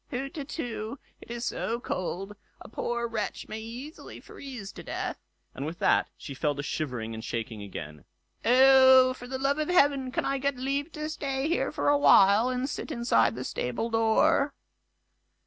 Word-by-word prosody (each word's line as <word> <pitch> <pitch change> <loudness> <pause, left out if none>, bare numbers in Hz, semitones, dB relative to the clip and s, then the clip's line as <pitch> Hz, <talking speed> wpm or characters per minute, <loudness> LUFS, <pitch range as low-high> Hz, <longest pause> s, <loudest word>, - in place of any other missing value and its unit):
"Hutetu! 270 -3 -5 0.2
it - - -14
is 240 +1 -4
so 230 +1 -2
cold, 195 -1 -4 0.2
a - - -11
poor 235 +1 -2
wretch 220 -2 -4
may 215 - -5
easily 245 +8 -9
freeze 245 -8 -9
to - - -10
death"; - - -4 0.3
and 135 - -6
with 160 +3 -5
that - - +2
she 140 - -8
fell 145 +2 -1
to 145 - -4
shivering 125 -7 -3
and 110 0 -7
shaking 115 -2 -4
again. 75 -7 -8 0.4
"Oh! 260 +1 +7
for 245 -1 -10
the 260 +1 -3
love 275 +3 0
of 310 - -1
heaven, 280 -6 +3
can - - -1
I 275 0 0
get 280 -1 -1
leave 275 +4 -2
to 305 0 -4
stay 275 -3 -2
here 335 - 0
a 290 - +3
while, 205 -2 +6
and 255 +1 -1
sit - - -5
inside 230 - +2
the 125 - -5
stable 125 - -3
door?" 275 +6 +3
245 Hz, 170 wpm, -28 LUFS, 195-275 Hz, 0.4 s, Oh